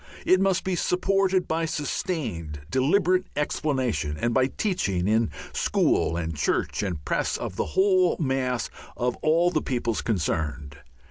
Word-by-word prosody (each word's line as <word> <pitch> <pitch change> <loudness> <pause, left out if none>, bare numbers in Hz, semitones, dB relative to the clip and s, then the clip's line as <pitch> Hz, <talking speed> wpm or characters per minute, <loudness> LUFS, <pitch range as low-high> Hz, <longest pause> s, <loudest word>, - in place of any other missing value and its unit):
It 185 0 +4
must 195 -1 +2
be 185 -1 -1
supported 185 +1 +1
by 165 +1 0
sustained, 120 - -3
deliberate 180 +7 +2
explanation, 130 - -1
and 120 +9 0
by 130 +1 +3
teaching 135 - -1
in 110 0 +2 0.2
school 85 - +1
and 80 -2 -3
church 75 - 0
and 90 -8 -4
press - - 0
of - - -5
the - - -1
whole 185 -2 +4
mass 130 -5 -1 0.3
of 125 0 0
all 170 +3 +3
the 155 -3 0
peoples 120 -3 -1
concerned. 75 -7 -2
130 Hz, 140 wpm, -26 LUFS, -, 0.3 s, It